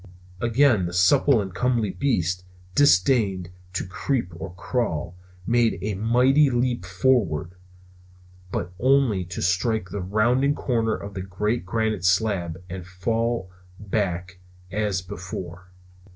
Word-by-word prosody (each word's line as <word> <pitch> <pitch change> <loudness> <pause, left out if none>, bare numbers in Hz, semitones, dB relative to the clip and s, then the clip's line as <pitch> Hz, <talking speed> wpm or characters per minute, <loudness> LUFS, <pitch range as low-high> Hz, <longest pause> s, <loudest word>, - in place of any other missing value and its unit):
Again 115 -4 +3
the 85 - -6
supple 95 +8 +4
and 95 -3 -4
comely 120 -3 0
beast, 90 -10 0 0.3
disdaining 95 -7 +3 0.2
to 95 - -2
creep 95 0 -2
or 90 +2 -7
crawl, 90 - -2 0.3
made 115 -2 +2
a 105 +1 -1
mighty 125 +8 +4
leap 120 -6 -1 0.2
upward. 95 -11 +2 1.0
But 90 +1 -3
only 130 -6 +3
to 90 0 -5
strike 90 +3 0
the 100 - -3
rounding 120 +9 +2
corner 115 -3 0
of 100 0 -8
the 95 - -4
great 100 +3 -2
granite 110 -2 -1
slab 90 -3 +1
and 90 0 -6
fall 115 +2 -1 0.3
back 95 -3 -2 0.3
as 100 -2 -1
before. 90 0 -7
100 Hz, 125 wpm, -24 LUFS, 90-120 Hz, 1.0 s, supple